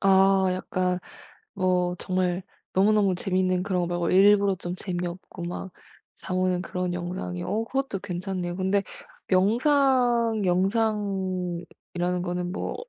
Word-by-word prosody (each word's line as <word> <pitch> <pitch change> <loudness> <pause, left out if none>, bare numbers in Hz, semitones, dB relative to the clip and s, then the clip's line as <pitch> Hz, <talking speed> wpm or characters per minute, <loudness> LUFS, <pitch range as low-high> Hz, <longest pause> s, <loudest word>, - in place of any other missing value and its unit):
아 195 0 +5
약간 185 0 -1 0.6
뭐 180 -1 +1
정말 185 -1 -1 0.3
너무너무 200 -1 +3
재밌는 185 0 0
그런 185 -2 0
거 175 - -1
말고 175 -1 -1
일부러 200 +1 +5
좀 175 0 -5
재미없고 180 -1 -5
막 180 +2 -5 0.4
잠 185 - -4
오는 185 -1 +1
그런 180 -1 -3
영상이 175 - -4
어 215 +4 -1
그것도 270 -2 -2
괜찮네요. 185 -2 -4
근데 190 +2 +1 0.4
명상 235 +2 +3
영상이라는 185 -3 -1
거는 180 0 -3
뭐 - - -3
185 Hz, 255 characters per minute, -26 LUFS, 180-200 Hz, 0.6 s, 아